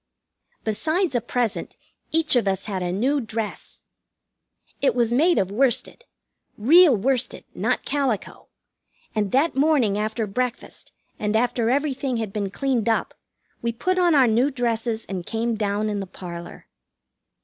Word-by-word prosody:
Besides 315 - 0
a 240 - +1
present, 240 -2 -2 0.4
each 320 -3 +2
of 235 -4 +2
us 195 0 -1
had 195 -4 -3
a 175 -1 -1
new 260 +10 +1
dress. 220 -1 -6 1.0
It 275 - +2
was 235 -1 +2
made 330 +7 +4
of 190 0 +1
worsted 260 - 0 0.5
real 295 +4 +6
worsted, 255 +4 -1
not - - -1
calico; 270 -7 -2 0.7
and 205 -3 -1
that 285 +6 +2
morning 270 -8 +2
after 220 +1 -1
breakfast, 245 +5 -4 0.3
and 210 0 -1
after 235 0 +1
everything 270 -2 0
had 220 -3 -4
been 205 -2 -2
cleaned 245 0 0
up, 225 - 0 0.5
we 235 - 0
put 370 +11 -1
on 350 -3 +4
our 270 -3 +6
new 240 +4 +3
dresses 235 -3 -2
and 185 -2 -5
came 230 +4 -2
down 210 -1 -1
in 205 -1 -2
the 195 - -5
parlor. 170 -1 -9
235 Hz, 150 wpm, -23 LUFS, 210-270 Hz, 1.0 s, real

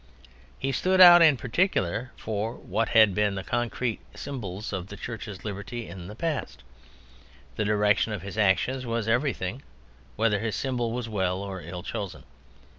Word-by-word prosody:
He 135 - -2
stood 185 +8 +1
out 175 -1 +10
in 155 -5 +6
particular 125 - 0
for 110 +1 -3
what 110 +5 -2
had 110 -3 +6
been 105 0 +1
the 95 - -4
concrete 120 0 -2 0.2
symbols 105 -7 -6
of 95 -1 -4
the 105 - -9
Church's 110 -3 -7
liberty 105 +3 -5
in 85 0 -9
the 105 - -9
past. 130 - -3 0.9
The 110 - -1
direction 105 +1 +2
of 100 -5 -4
his 100 +1 -7
actions 110 +6 +2
was 115 -2 -2
everything, 120 -2 0 0.5
whether 105 -2 +2
his 110 0 -2
symbol 125 -4 -1
was 120 0 -3
well 95 -3 -1
or 95 -2 -6
ill 85 +2 -7
chosen. 100 -1 -5
110 Hz, 160 wpm, -27 LUFS, 100-120 Hz, 0.9 s, out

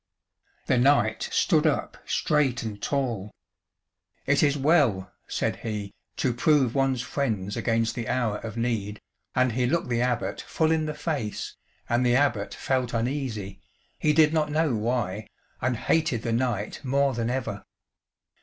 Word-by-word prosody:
The 130 - +2
knight 120 -5 +3
stood - - +3
up - - -1
straight 145 -6 +1
and 105 -2 -6
tall: 120 -8 -1 1.0
"It 145 +1 +3
is 145 -1 +3
well," 135 - +2 0.2
said - - -1
he, 105 -3 -5 0.2
"to 125 - +1
prove 130 -1 +3
one's 135 -3 +1
friends 105 -8 -2
against 115 -1 0
the 115 -3 -4
hour 120 -5 0
of 115 0 -7
need," 110 -3 -2 0.4
and 125 0 +3
he 125 +2 +1
looked 165 0 0
the 120 -1 +1
Abbot 125 -1 -1
full 160 -1 0
in 160 -1 +1
the 155 - -3
face, 145 -8 -3 0.3
and 120 +1 +2
the 120 0 +3
Abbot 125 -7 +1
felt 130 -3 -1
uneasy, 115 -6 -3 0.4
he 155 - +3
did 155 0 +5
not 155 -2 +1
know 155 -2 +1
why, 110 -2 -1 0.3
and 125 0 0
hated 145 -4 +1
the 115 - -1
knight 115 -1 -1
more 140 +1 +2
than 115 -1 -1
ever. 120 -5 -3
125 Hz, 155 wpm, -26 LUFS, 110-140 Hz, 1.0 s, did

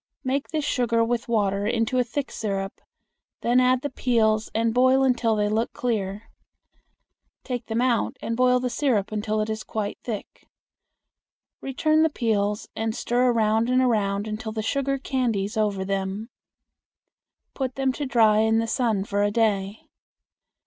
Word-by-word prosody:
Make 270 +1 -1
this 305 -1 -2
sugar 235 -4 +1
with 240 0 -2
water 205 -3 0
into 235 +2 +1
a - - +4
thick 270 +4 -4
syrup; 195 -3 -4 0.6
then 245 +2 +3
add 255 0 +3
the 285 - -1
peels 220 -4 +1
and 225 0 +1
boil 260 +2 +4
until 240 -4 +2
they 210 -1 +1
look 220 +3 0
clear. 210 -3 -3 1.1
Take 245 -3 -4
them 225 +1 0
out 250 -2 +1
and 230 - -3
boil 250 +1 +3
the 250 -1 -2
syrup 235 -7 0
until 215 0 -1
it 215 - -1
is 215 0 -4
quite 210 -2 -4
thick. 220 -4 -7 1.1
Return 310 +4 +1
the 320 - +4
peels 210 -6 -1
and 225 0 -2
stir 245 +1 +1
around 225 0 +2
and 255 0 +3
around 210 -5 +1
until 220 +1 -4
the 220 0 -3
sugar 275 +3 0
candies 235 -7 -1
over 205 -3 0
them. 195 +3 -3 1.2
Put 260 -2 -3
them 270 -1 +1
to 285 +1 -4
dry 220 -4 +4
in 220 0 +3
the 225 - +1
sun 225 -3 0
for 200 0 -1
a 205 - +3
day. 205 -2 0
225 Hz, 160 wpm, -24 LUFS, 215-250 Hz, 1.2 s, a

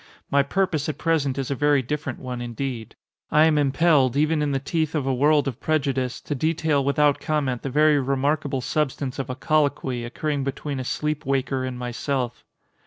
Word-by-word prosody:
My 140 - +5
purpose 160 0 0
at 155 - -4
present 145 -5 0
is 135 0 -3
a - - 0
very 145 0 +3
different 145 0 -3
one 125 -1 -6
indeed. 120 -1 -5 0.3
I 155 +1 +5
am 155 -2 +3
impelled, 140 -2 +3
even 155 +1 +2
in 145 -1 0
the 135 - +1
teeth 155 +3 -2
of 145 -4 0
a 135 - +1
world 145 +2 +3
of 130 -2 -4
prejudice, 135 -5 -1
to - - -4
detail 155 0 +1
without 145 +1 +2
comment 140 -6 -1
the 135 - -4
very 150 +2 +4
remarkable 140 +1 0
substance 140 -1 -2
of 135 - -3
a 130 - -3
colloquy, 140 -4 0
occurring 140 +4 -2
between 140 +1 -4
a - - -3
sleep 150 +4 -2
waker 135 -1 -1
and 130 -1 -4
myself. 125 +1 -3
140 Hz, 185 wpm, -24 LUFS, 130-150 Hz, 0.3 s, My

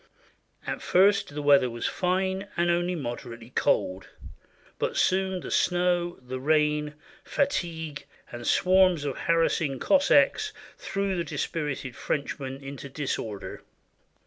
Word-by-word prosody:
At - - -4
first 195 -3 +3
the 150 - -3
weather 140 -3 +5
was 120 0 -5
fine 190 +1 0
and 175 0 +3
only 175 +1 0
moderately 120 -4 -6
cold; 95 -5 0 0.7
but - - -1
soon 190 0 +1
the - - -7
snow, 175 -1 +1
the 130 +1 -5
rain, 150 +1 +1 0.3
fatigue, 165 - -2 0.3
and 120 0 -7
swarms 185 -4 +4
of 140 - -2
harassing 165 -4 +1
Cossacks 285 - +3 0.2
threw 195 -1 -2
the 170 - -1
dispirited 145 -7 -3
French 145 0 -3
men 135 0 -6
into 140 0 -8
disorder. 130 -7 -4
160 Hz, 120 wpm, -27 LUFS, 135-185 Hz, 0.7 s, weather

